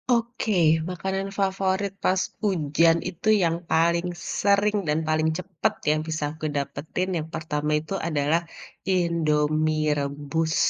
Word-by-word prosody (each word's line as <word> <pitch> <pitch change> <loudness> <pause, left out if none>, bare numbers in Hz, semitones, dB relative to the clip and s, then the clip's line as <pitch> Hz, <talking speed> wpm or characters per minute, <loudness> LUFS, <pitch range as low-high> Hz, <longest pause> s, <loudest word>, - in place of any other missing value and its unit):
Oke, 230 -3 -1 0.3
makanan 190 +2 -2
favorit 195 0 0
pas 185 0 +3 0.2
hujan 165 -4 +3
itu 185 +4 -8 0.2
yang 165 -1 +2 0.2
paling 170 +2 +3 0.3
sering 205 +1 +3
dan 150 +1 +2
paling 155 0 +2
cepet 185 -2 -1 0.2
yang 155 - +1
bisa 155 -1 -2
aku 155 0 -7
dapetin 155 +6 -3
yang 155 -1 -4
pertama 150 -1 -2
itu 160 +5 -5
adalah, 155 +1 +1 0.6
Indomie 155 -2 +1
rebus. 145 +3 -2
165 Hz, 125 wpm, -25 LUFS, 155-190 Hz, 0.6 s, pas